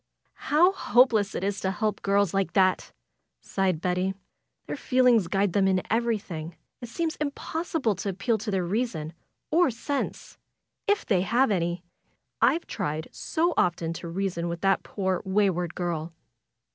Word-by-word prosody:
^^How 350 +6 +4
hopeless 240 - +3
it - - -3
is 200 0 -1
to 190 - -1
help 210 +2 -1
girls 200 -2 +2
like 195 -3 0
that!" 185 -1 +2 0.5
sighed 190 -4 -1
Betty. 180 +1 0 0.5
''Their - - -4
feelings 250 - +3
guide 195 0 +1
them 195 -1 +3
in 185 -1 +2
everjflhing. 200 -8 -1 0.3
It 240 - -7
seems 325 +5 -2
impossible 300 -3 -2
to 200 - -3
appeal 205 +4 0
to 215 +2 -5
their 190 -3 0
reason 175 -6 -2 0.4
or 345 0 +4
sense; 270 +4 -4 0.5
if 410 0 +2
they 190 -5 +2
have 235 +6 +2
any! 175 -2 -1 0.6
I've 335 - +3
tried 160 -5 -3
so 340 +2 0
often 170 -2 +1
to 170 - -6
reason 175 -1 -2
with 170 0 -5
that 195 0 +3
poor, 190 -2 -2
wayward 190 -4 +1
girl!" 170 -2 -3
195 Hz, 150 wpm, -26 LUFS, 180-235 Hz, 0.6 s, ^^How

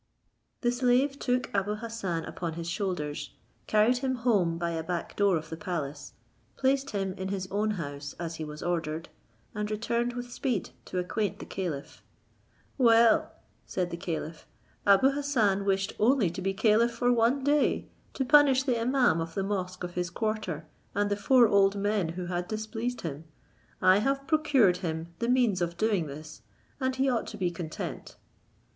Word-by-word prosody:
The 240 - +2
slave 255 +3 +2
took 250 0 -1
Abou 205 +1 0
Hassan 210 -7 -4
upon 170 -2 -4
his 165 +1 -5
shoulders, 175 -5 -3 0.3
carried 220 +4 +3
him 260 0 -1
home 205 -9 +1
by 170 0 -1
a 165 -1 -2
back 170 +1 -4
door 200 -4 +3
of 160 +1 -8
the 160 - -4
palace, 165 -7 -4 0.4
placed 270 +1 +1
him 195 -3 -2
in 190 - -3
his 190 -1 -3
own 210 +2 +1
house 145 -3 -6
as 165 -1 -4
he 160 - -4
was 150 0 -7
ordered, 165 -2 -2 0.4
and 210 0 -3
returned 235 +3 -1
with 245 0 -6
speed, 240 -6 -2
to - - -5
acquaint 190 +2 -1
the - - -8
caliph. 165 -7 -5 0.8
"Well," 230 -2 +5 0.4
said 180 -2 -2
the - - -3
caliph, 165 -3 -5 0.4
"Abou 200 +7 +6
Hassan 235 -9 +1
wished 195 0 +1
only 220 -5 +3
to 185 - -6
be 195 +1 0
caliph 220 +3 +3
for 245 +1 +2
one 240 +4 +2
day, 290 +1 +2 0.3
to 265 - 0
punish 280 -2 +6
the 250 -4 0
imaum 245 -8 +3
of 165 0 -6
the 195 - 0
mosque 185 -2 -3
of 175 0 -5
his 180 -1 -2
quarter, 185 -5 -3 0.3
and 205 0 +1
the - - +3
four 240 +3 +5
old 200 -1 +4
men 200 -3 0
who 180 - -3
had 175 0 -3
displeased 220 +3 -3
him: 155 -1 -5 0.6
I 185 +2 +6
have 275 +4 0
procured 275 - +3
him 165 -1 -4
the 235 - -1
means 240 -7 +3
of 170 0 -2
doing 200 -5 +1
this, 155 +2 -9 0.4
and 260 -1 0
he 265 +1 +1
ought 245 -3 0
to 215 - -7
be 180 -3 0
content." 165 -2 -6
200 Hz, 175 wpm, -29 LUFS, 175-240 Hz, 0.8 s, Abou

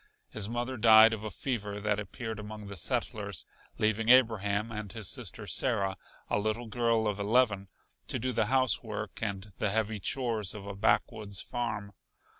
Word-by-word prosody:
His 105 -1 -2
mother 120 +2 -3
died 110 0 +8
of 110 -1 -5
a 110 - -3
fever 105 -3 -3
that 105 0 0
appeared 110 +1 -6
among 105 0 -8
the 100 0 -7
settlers, 100 - -2 0.3
leaving 110 +1 +1
Abraham 110 -4 +4
and 105 -3 -5
his 110 -2 -4
sister - - -2
Sarah, 100 -7 +1 0.3
a - - +1
little 110 +3 -1
girl 115 -1 +1
of 105 -1 -2
eleven, 100 -2 +2 0.4
to - - -1
do 130 +3 -2
the 115 -2 +1
housework 115 -5 +1
and 100 -2 -4
the 105 - +1
heavy 110 0 0
chores 110 -2 0
of 100 -2 -8
a 100 - -5
backwoods 100 -1 0
farm. 110 -4 -3
110 Hz, 165 wpm, -30 LUFS, 100-115 Hz, 0.4 s, died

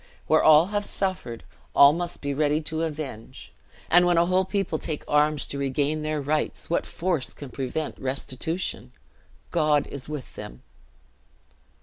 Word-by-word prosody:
Where 155 +1 +4
all 155 +1 +7
have 205 0 +1
suffered, 185 - -3 0.3
all 140 +1 +8
must 175 +1 -4
be 140 0 -1
ready 150 +1 +2
to 160 +1 -3
avenge; 150 -8 -6 0.3
and 175 +1 +6
when 175 -1 +3
a 170 - +5
whole 185 +1 +2
people 195 -1 -1
take 155 -3 -4
up - - -11
arms 150 0 +3
to 140 - -5
regain 140 +3 0
their 155 0 -1
rights, 150 +3 -2
what - - +1
force 170 -6 -2
can 140 -3 -9
prevent 135 +4 -4
restitution? 135 +6 -3 0.6
God 150 -3 +3
is 140 +1 -8
with 150 -4 -6
them!" - - -9
155 Hz, 155 wpm, -25 LUFS, 140-170 Hz, 0.6 s, all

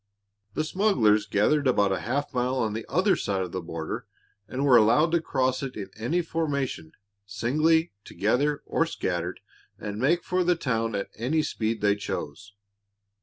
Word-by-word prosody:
The 155 - +1
smugglers 125 - +2
gathered 140 +9 +2
about 100 -6 +3
half 130 +10 -2
a - - -13
mile 125 +1 +1
on 110 -5 0
the 110 0 -5
other 185 +6 +3
side 95 -2 -1
of 90 - -6
the 95 - -3
border 80 -1 -5 0.4
and 135 +5 -2
were 130 -3 +6
allowed 120 +9 +5
to 170 -1 +2
cross 130 -4 0
it 135 -2 -5
in 100 - -6
any 155 +12 -1
formation, 140 - -2 0.3
singly, 155 - +2
together, 140 +10 0
or 165 - +1
scattered, 90 - -3 0.4
and 105 +1 -5
make 170 +8 +2
for 185 0 0
the 175 0 +3
town 115 -7 -1
at 100 - -3
any 150 +7 +1
speed 110 -3 -2
they 100 -1 +3
chose. 100 -1 -6
125 Hz, 170 wpm, -26 LUFS, 105-155 Hz, 0.4 s, were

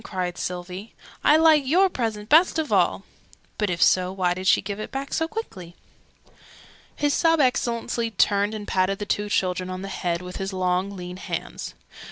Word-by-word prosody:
cried 180 -2 -3
Sylvie. 180 +4 -6 0.3
"I 300 - +6
like 315 -2 +5
your 365 +7 +4
present 225 - -3
best 325 +7 +5
of 315 -2 -1
all!" - - +2 0.6
(But 210 -2 +1
if 175 -1 +2
so, 185 0 +3
why 185 -2 0
did 185 +1 -5
she - - +5
give 200 +1 -5
it 215 - -5
back 275 +1 -5
so 320 - 0
quickly?) 190 - -7 1.2
His 290 -1 +1
Sub 330 -1 +3
Excellency 235 -3 0
turned 205 0 +1
and 210 -1 -7
patted 190 +1 +1
the 205 - -5
two 205 0 -1
children 185 -2 0
on 185 +1 -5
the 195 - -5
head 175 -2 -2
with 180 0 -7
his 195 0 -4
long 185 +1 -1
lean 180 0 -7
hands. - - -6
200 Hz, 185 wpm, -24 LUFS, 185-255 Hz, 1.2 s, I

